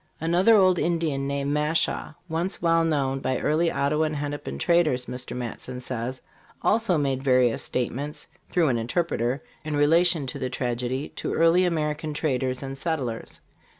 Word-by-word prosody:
Another 175 +7 +4
old 185 -4 +5
Indian 160 -5 0
named 140 0 -1
Mashaw, 150 0 0
once 170 +3 -2
well 165 -1 +3
known 140 -4 0
by 130 -1 -1
early 160 +3 +1
Ottawa 150 +2 +1
and 155 0 -2
Hennepin 145 - -4
traders, 150 - +2
Mr 125 0 -5
Matson 125 +1 -5
says, 125 0 -5 0.4
also 220 -5 +2
made 135 -3 0
various 125 -3 +3
statements, 140 +5 -3 0.2
through 170 -4 +2
an 120 -2 +1
interpreter, 125 0 -1 0.2
in 155 -1 -3
relation 165 +1 +4
to 130 +2 -5
the 130 -1 -2
tragedy, 125 +2 -2
to - - -2
early 165 +2 +4
American 155 -2 -1
traders 130 -3 -1
and 135 0 -6
settlers. 135 -9 -3
145 Hz, 150 wpm, -25 LUFS, 130-165 Hz, 0.4 s, old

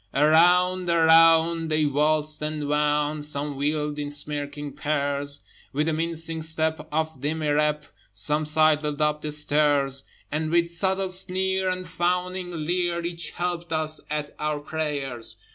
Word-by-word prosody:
Around, 180 +5 +4
around, 165 0 +5
they 155 -1 +1
waltzed 150 +1 +1
and 150 -1 -3
wound; 150 0 0
Some 145 -1 -2
wheeled 150 +1 -2
in 145 0 -3
smirking 145 0 -4
pairs: 145 -1 -2 0.3
With 150 +2 0
the 160 - 0
mincing 165 0 -1
step 160 -1 0
of 160 -3 -2
demirep 150 0 0 0.3
Some 150 +10 0
sidled 155 -1 +2
up 150 0 +1
the 150 - -4
stairs: 145 -2 +2 0.3
And 155 +1 -2
with 170 +1 +2
subtle 190 +2 0
sneer, 190 0 +1
and 185 0 -3
fawning 180 -1 -2
leer, 175 0 -1
Each 170 -2 -4
helped 175 +1 -4
us 155 -1 -1
at 150 -1 -4
our 150 -1 -2
prayers. 145 -6 +1
155 Hz, 135 wpm, -24 LUFS, 150-170 Hz, 0.3 s, around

